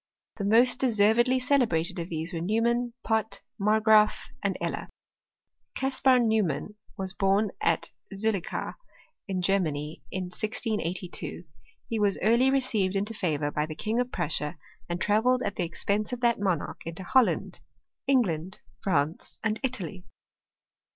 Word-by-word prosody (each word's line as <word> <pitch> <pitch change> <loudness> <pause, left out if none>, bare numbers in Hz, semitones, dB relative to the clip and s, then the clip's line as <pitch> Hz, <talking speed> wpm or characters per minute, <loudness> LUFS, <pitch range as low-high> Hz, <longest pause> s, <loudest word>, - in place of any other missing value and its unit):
The 200 - -2
most 240 +5 +5
deservedly 240 +1 +4
celebrated 225 - +1
of 170 +1 -4
these 165 +2 -4
were 165 - -3
Neumann, 235 +5 +1
Pott, 220 -2 -1 0.2
Margraaf, 215 +1 +4
and - - -1
Eller. - - -3 0.9
Caspar 265 -1 +3
Neumann 220 -4 +1 0.2
was 190 -1 -3
born 200 +1 +2
at - - +1 0.2
Zullichau, 200 -2 -2 0.5
in 185 -2 -2
Ger 195 +2 +3
many, 150 -2 -3
in 185 - -3
1682. 185 -2 -3 0.4
He 225 -2 -2
was 205 -2 +2
early 235 +5 +4
received 235 -8 +1
into 205 +3 -1
favour 155 -8 -1
by 150 +1 -1
the 155 - -6
King 220 +8 -1
of 245 - +1
Pinissia, 155 -4 -2 0.3
and 175 0 -2
travelled 240 +6 +2
at 200 - -2
the 180 - 0
expense 205 +5 -1
of 245 -1 -4
that 235 -3 +2
monarch 185 -6 -1
into 165 +3 -5
Holland, 255 +6 +2 0.5
England, 190 - +1 0.2
France, 165 -4 -1
and 220 -1 0
Italy. 200 - -4
205 Hz, 135 wpm, -28 LUFS, 180-235 Hz, 0.9 s, most